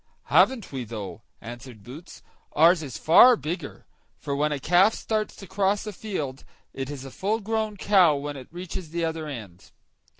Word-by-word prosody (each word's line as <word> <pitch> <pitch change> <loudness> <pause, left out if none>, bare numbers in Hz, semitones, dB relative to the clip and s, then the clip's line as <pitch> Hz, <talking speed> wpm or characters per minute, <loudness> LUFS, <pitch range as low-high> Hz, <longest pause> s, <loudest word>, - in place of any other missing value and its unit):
"Haven't 250 -7 +3
we 130 -2 -4
though!" 110 -2 -7 0.2
answered 120 -2 -10
Boots; 140 - -12 0.3
"ours 165 +2 +5
is 130 -8 -7
far 240 - +7
bigger; 165 -5 -6 0.3
for 140 - -4
when 150 +2 0
a 145 - -2
calf 180 +9 +4
starts 215 -1 -2
to 195 - -11
cross 195 +2 0
a 210 - -5
field, 155 -11 -5 0.3
it 135 0 -5
is 140 -2 -7
a 135 - -9
full 210 - -1
grown 220 0 -2
cow 185 -7 +4
when 145 +1 -5
it 130 -2 -10
reaches 175 0 -7
the 170 +1 -2
other 160 -1 -4
end." 95 - -9
160 Hz, 175 wpm, -25 LUFS, 135-195 Hz, 0.3 s, far